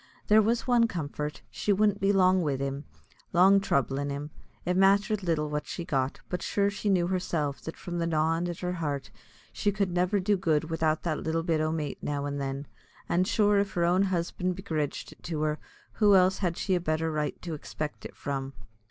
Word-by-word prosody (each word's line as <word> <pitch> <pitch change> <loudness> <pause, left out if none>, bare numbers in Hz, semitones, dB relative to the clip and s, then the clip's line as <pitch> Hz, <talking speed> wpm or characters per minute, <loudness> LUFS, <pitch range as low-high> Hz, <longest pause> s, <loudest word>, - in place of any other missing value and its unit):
There 215 +1 +7
was 230 +3 +1
one 240 -2 +4
comfort: 150 -5 -4
she 210 - -1
wouldn't 205 0 +3
be 195 +1 +4
long 185 -1 +4
wid 140 -5 -1
him 140 +1 -3 0.5
long 190 +3 +6
troublin' 140 -6 0
him; 145 +2 -5 0.3
it 180 +1 +1
matthered 200 +2 +3
little 165 -4 0
what 150 0 -3
she 170 - -5
got; 135 -5 -1
but 180 -1 -3
sure 200 +2 +1
she 205 +1 -2
knew 180 -3 +3
herself, 170 -6 -1
that 160 - -7
from 175 -1 -5
the 170 - 0
gnawin' 165 +2 +1
at 170 - -6
her 180 -1 -1
heart, 140 -6 -3 0.4
she 205 - +1
could 200 -2 -1
never 180 +3 +1
do 205 +2 +2
good 160 -3 0
widout 160 -1 +1
the 165 -3 0
little 160 +2 -1
bit 165 -2 +1
o' 155 0 +1
mait 150 -3 -3
now 145 -1 -2
and 145 0 -3
then; 135 +1 -3 0.4
an', 180 +2 +2
sure, 205 0 +3
if 200 -1 -1
her 170 -1 +1
own 180 +2 +3
husband 180 -1 -1
begridged 155 -6 -3
it - - -17
to 160 -3 -3
her, 150 0 0 0.3
who 205 -2 +4
else 185 0 +4
had 175 -4 -1
she 190 - 0
a 180 - +3
better 160 -1 -1
right 150 -1 -2
to 170 -2 -4
expect 150 0 -5
it - - -9
from? 135 -1 -4
170 Hz, 210 wpm, -28 LUFS, 150-190 Hz, 0.5 s, There